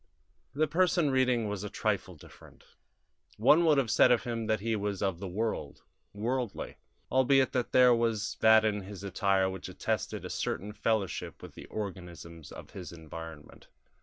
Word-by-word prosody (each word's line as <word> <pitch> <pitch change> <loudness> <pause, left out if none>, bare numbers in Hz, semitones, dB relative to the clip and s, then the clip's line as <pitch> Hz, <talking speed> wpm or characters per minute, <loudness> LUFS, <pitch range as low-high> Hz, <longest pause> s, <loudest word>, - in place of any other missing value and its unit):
The 155 +2 +3
person 165 -1 +2
reading 125 -4 +2
was 105 -1 -4
a 105 - -4
trifle - - -2
different; - - -17 0.7
one 150 +10 +5
would 155 -3 +4
have 130 -5 +1
said - - +5
of 120 - +3
him 115 -2 -3
that 110 0 +1
he 115 +2 -1
was 100 -1 -2
of 95 -4 -1
the 100 - -5
world, 110 +5 -3 0.3
worldly, 120 +2 -3 0.3
albeit 130 +1 +4
there 125 0 +4
was 115 -3 0
that 110 0 +6
in 105 -1 0
his 95 0 -9
attire 95 0 +1
which 95 -1 -6
attested - - -3
a - - -5
certain 105 +3 -3
fellowship 110 -4 -2
with - - -10
the - - -11
organisms 85 -5 -7
of - - -11
his 90 -3 -8
environment. 80 -2 -10
110 Hz, 165 wpm, -30 LUFS, 95-125 Hz, 0.7 s, that